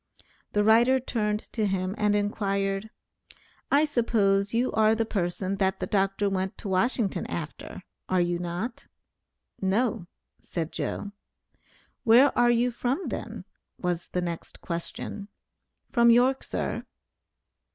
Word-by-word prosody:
The 210 - +3
writer 235 +5 +5
turned 210 -4 -1
to 215 -3 +1
him 190 -1 -1
and 210 -1 +2
inquired, 200 0 -1 0.8
"I 290 +2 +4
suppose 210 -7 +2
you 240 +2 +1
are 220 0 +4
the 225 0 0
person 190 -1 -2
that 190 -1 +1
the - - -1
Dr. 195 0 +1
went 190 -1 -2
to - - -7
Washington 200 +2 +1
after, 165 +3 -6 0.3
are 185 - +2
you 175 0 +1
not?" 180 +7 -4 0.7
"No," 195 -1 0 0.3
said 165 -2 -4
"Joe." 205 - -4 0.9
"Where 250 +4 +6
are 240 0 +4
you 240 +1 +3
from 255 +9 -2
then?" - - -6 0.3
was 175 -1 -2
the 180 - -2
next 170 -1 -5
question. 175 +4 -5 0.6
"From 235 -2 +5
York, 250 +3 +4
sir." - - -3
205 Hz, 130 wpm, -27 LUFS, 190-235 Hz, 0.9 s, Where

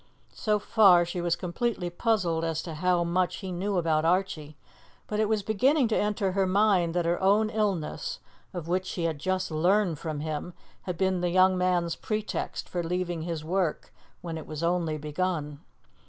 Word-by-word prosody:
So 210 -1 +1
far 195 -5 +5
she 175 +1 -4
was 170 -1 +1
completely 180 0 -2
puzzled 175 -5 0
as 165 -1 -2
to 165 - -6
how 175 +2 +1
much 175 +1 0
he 190 -3 -6
knew 190 +2 -1
about 160 -2 +1
Archie, 165 -4 0 0.5
but 210 - -3
it 215 -1 +2
was 215 -2 +1
beginning 255 +7 +3
to 220 - +1
enter 205 -2 0
her 190 0 +1
mind 185 -3 +2
that 175 -1 +1
her 170 +2 0
own 210 +3 +3
illness, 200 -8 -2 0.3
of 175 -3 -6
which 185 +2 0
she 175 - -3
had 160 -3 -1
just 185 +2 -1
learned 175 +1 +2
from 155 -3 -4
him, 155 +3 -4 0.3
had 180 -3 -5
been 190 -1 +1
the 175 - +1
young 185 +1 +4
man's 180 -2 +1
pretext 215 -1 -3
for 175 - -2
leaving 175 0 -2
his 160 -2 -4
work 180 -1 -1 0.3
when 165 -2 -5
it - - -10
was 155 +1 -5
only 170 -2 0
begun. 150 -1 -3
180 Hz, 185 wpm, -27 LUFS, 165-195 Hz, 0.5 s, far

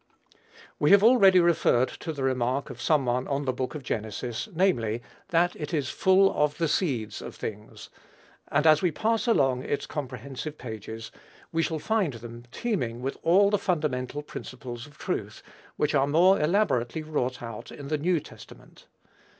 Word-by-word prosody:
We - - +3
have 200 0 +7
already 200 -6 +7
referred 165 -7 +3
to 165 - -6
the 140 -3 -5
remark 130 +1 0
of 120 - -10
some 145 +1 +2
one 125 +1 0
on 140 0 -1
the 130 - 0
book 130 +4 -4
of 150 - -6
Genesis, 115 - -4
namely, 120 - +1 0.3
that 175 +1 +2
it 150 +2 -4
is 140 -4 -1
"full 190 +1 +4
of 150 0 +1
the 165 - +1
seeds 140 - -1
of - - -8
things;" 105 -1 -8 0.6
and 150 +2 +1
as 155 -1 +6
we 180 - +3
pass 220 +9 0
along 135 - +3
its 140 - -2
comprehensive 140 +1 -6
pages, 110 -1 -7 0.4
we 165 - +1
shall 160 0 -1
find 195 -2 0
them 120 +1 -10
teeming 125 - -2
with 135 - -2
all 195 +4 +4
the 205 - +2
fundamental 145 -6 -1
principles 125 -3 -8
of 150 +1 -19
truth, - - -4 0.3
which 150 0 +1
are 140 -1 +3
more 175 +6 +4
elaborately 155 - +1
wrought 130 -5 -2
out 115 -2 -7
in 140 -1 -9
the 155 - +1
New 170 +2 +2
Testament. - - -15
145 Hz, 170 wpm, -27 LUFS, 125-170 Hz, 0.6 s, have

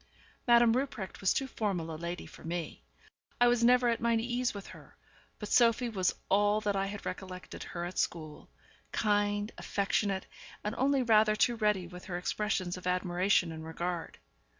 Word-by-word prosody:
Madame 235 -1 +6
Rupprecht 250 -8 -3
was 195 - +3
too 270 - 0
formal 195 -10 -2
a - - -5
lady 170 +2 -5
for - - -14
me; 170 0 -4 0.6
I 245 - +6
was 240 -1 +3
never 250 +1 +5
at 230 -1 +1
my 235 0 +2
ease 245 +2 0
with 200 -1 -8
her; - - -14 0.4
but 210 - -6
Sophie 235 0 +4
was 190 -5 0
all 205 +2 +3
that 205 -2 0
I 195 0 0
had 205 0 -7
recollected 185 -1 -7
her 175 0 -5
at 175 0 -4
school: 155 -3 -3 0.4
kind, 205 0 +1
affectionate, 195 -1 0 0.4
and 210 - -2
only 270 +2 +2
rather 215 -2 +4
too 240 +2 +2
ready 210 -5 +1
with 180 +1 -10
her 175 -3 -4
expressions 185 -1 -1
of 180 - -7
admiration 180 0 +2
and 160 0 -7
regard. 170 +1 -4
205 Hz, 175 wpm, -31 LUFS, 180-230 Hz, 0.6 s, Madame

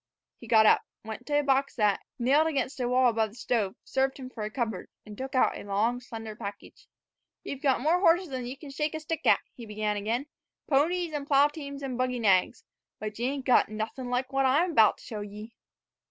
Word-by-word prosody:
He 235 - -12
got 220 -1 +6
up, - - +6 0.2
went 220 +3 -7
to 290 -1 +1
a - - -7
box 275 0 +1
that, 210 -4 +2 0.2
nailed 275 +6 +3
against 275 -3 -2
the 245 -1 0
wall 255 0 +4
above 220 -1 0
the 210 - -17
stove, 230 -5 -1
served 265 0 0
him 260 -2 -8
for 225 - -8
a 210 - -3
cupboard, 220 -4 -3 0.2
and 210 -1 -10
took 265 +4 -6
out 255 - +3
a - - -8
long, 210 +5 0
slender 225 -3 -8
package. 200 -2 -9 0.6
"Ye've 275 - -6
got 265 -3 +2
more 325 +6 +3
horses 350 -1 +3
than 255 -2 -4
ye 255 - -5
can 280 +1 -11
shake 300 +2 -2
a - - -3
stick 315 0 -4
at," - - +5
he 235 -4 -10
began 210 0 -2
again; 225 +6 -1 0.4
"ponies 325 +4 +1
an' 285 -1 -4
plow 285 0 +5
teams 280 -2 -8
an' 260 -3 -3
buggy 255 0 0
nags, 195 -6 +2 0.4
but 215 0 -6
ye 240 - 0
ain't 275 -1 -3
got 250 - +4
nuthin' 220 +4 -5
like 255 +2 -2
what 270 0 +3
I'm 325 +7 +2
'bout 220 -6 +5
to - - -17
show 215 -2 -6
ye." 210 +2 -9
255 Hz, 225 wpm, -28 LUFS, 220-280 Hz, 0.6 s, got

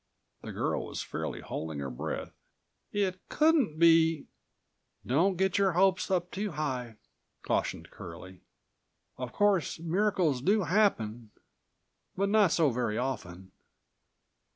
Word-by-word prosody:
The - - -7
girl - - -2
was - - -5
fairly - - -5
holding 80 -1 -5
her 70 -1 -4
breath. - - -5 0.6
"It 190 -3 -1
couldn't 305 - +3
be—" 165 -2 +4 0.8
"Don't 170 +9 +2
get 190 +1 +1
your 195 -2 +3
hopes 190 +2 +2
up 180 -2 0
too 200 -1 -3
high," 130 -6 -3 0.5
cautioned - - -2
Curlie. 90 +2 -10 0.8
"Of 125 -2 -4
course 205 - +2
miracles 170 -4 +1
do 205 +7 +2
happen, 120 - +1 0.9
but 200 +1 +1
not 205 -4 +4
so 160 -5 +3
very 115 -3 -1
often." 95 -8 -4
165 Hz, 120 wpm, -30 LUFS, 120-195 Hz, 0.9 s, be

